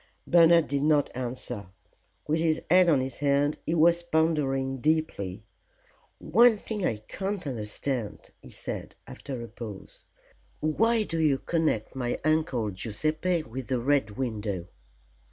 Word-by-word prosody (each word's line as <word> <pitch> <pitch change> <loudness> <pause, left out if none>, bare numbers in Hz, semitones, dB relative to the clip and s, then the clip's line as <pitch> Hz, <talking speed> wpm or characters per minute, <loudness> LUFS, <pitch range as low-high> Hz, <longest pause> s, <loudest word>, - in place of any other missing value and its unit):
Bernard 170 -1 +6
did 140 0 -1
not 150 -2 +2
answer. 125 -4 -5 0.6
With 155 +2 +1
his 160 -1 +1
head 180 -1 +6
on 145 -5 +4
his 130 -1 -5
hand 145 +1 +1
he 165 - +1
was 170 +1 +4
pondering 150 -5 0
deeply. 120 - -1 0.7
"One 235 -1 +5
thing 210 -1 -5
I 115 - +1
can't 195 -2 -4
understand," 120 -1 -4
he - - -13
said, - - -6
after 130 -4 -7
a - - -7
pause: 110 -3 -10 0.5
"Why 225 +9 +2
do 165 -5 -3
you 150 -4 +3
connect 155 -10 -1
my 120 -2 -2
Uncle 155 -9 +1
Guiseppe 155 - -1
with 130 -1 -7
the 130 -2 0
Red 135 -2 +2
Window?" 105 -8 -3
145 Hz, 135 wpm, -27 LUFS, 120-165 Hz, 0.7 s, Bernard